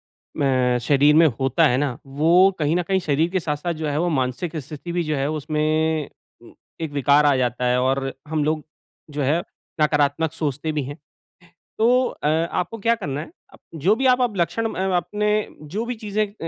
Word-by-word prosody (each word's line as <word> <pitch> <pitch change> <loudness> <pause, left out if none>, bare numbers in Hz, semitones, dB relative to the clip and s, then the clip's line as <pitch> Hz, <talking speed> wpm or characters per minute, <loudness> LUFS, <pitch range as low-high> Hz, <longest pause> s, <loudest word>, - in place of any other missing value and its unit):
अ, 130 -3 0
शरीर 145 +3 +4
में 165 +1 +7
होता 135 +5 +3
है 125 - +1
ना, 135 -4 -1
वो 165 +7 +4
कहीं 150 +1 +1
न 180 - +1
कहीं 190 +2 +1
शरीर 160 -1 +1
के 190 - +1
साथ-साथ 160 +1 -2
जो 155 -1 -4
है, 145 0 -1
वो 175 +1 +1
मानसिक 135 +3 -2
स्थिति 150 +4 -7
भी 175 0 0
जो 155 -1 -1
है, 140 +1 -1
उसमें 155 0 0 0.7
एक 160 -2 -3
विकार 145 +1 +4
आ 145 -2 +4
जाता 125 0 -1
है। 125 0 +2
और 135 +1 0
हम 155 -1 -1
लोग 155 0 -1 0.5
जो 145 0 -4
है, 150 +5 +1 0.4
नकारात्मक 150 +1 +2
सोचते 155 -1 -2
भी 150 -2 -2
हैं। 145 +3 -7 0.8
तो 245 +3 +4
अ, - - -4
आपको 170 +6 -1
क्या 230 +3 +2
करना 145 -10 -4
है, - - -10 0.4
जो 175 +8 +2
भी 265 +3 -1
अप 250 - +2
आप 225 -6 0
लक्षण 175 +7 0
म - - -6 0.2
अपने 210 +3 0 0.2
जो 195 +10 -4
भी 245 +1 -3
चीज़ें 215 -1 -1
अ, 200 - -18
155 Hz, 195 wpm, -22 LUFS, 145-175 Hz, 0.8 s, में